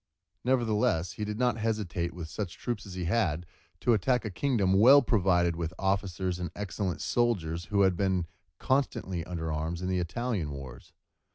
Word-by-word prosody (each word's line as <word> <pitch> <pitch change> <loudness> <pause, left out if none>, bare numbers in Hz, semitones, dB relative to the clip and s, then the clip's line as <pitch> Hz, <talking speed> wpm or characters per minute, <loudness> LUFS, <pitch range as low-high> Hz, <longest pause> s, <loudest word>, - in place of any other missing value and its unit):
Nevertheless, 110 -8 +1
he 105 - -5
did 105 0 -4
not 120 -2 +1
hesitate 105 -6 -1
with 85 -2 -7
such 90 +1 -5
troops 115 -4 -4
as 95 - -8
he 90 -1 -3
had, 85 -4 +1 0.4
to 120 - +4
attack 120 +4 +1
a 110 - -3
kingdom 105 -4 +1
well 125 +8 +8
provided 90 -7 +2
with 85 +1 -4
officers 95 -2 -1
and 90 - -3
excellent 100 -2 -3
soldiers 85 -9 0
who 100 +1 +1
had 95 -2 +4
been 95 -2 +1 0.3
constantly 110 -10 0
under 80 -3 -3
arms 80 +2 -2
in 90 +1 -3
the 95 -1 +1
Italian 90 -1 -2
wars. 70 -4 -9
95 Hz, 170 wpm, -29 LUFS, 85-110 Hz, 0.4 s, well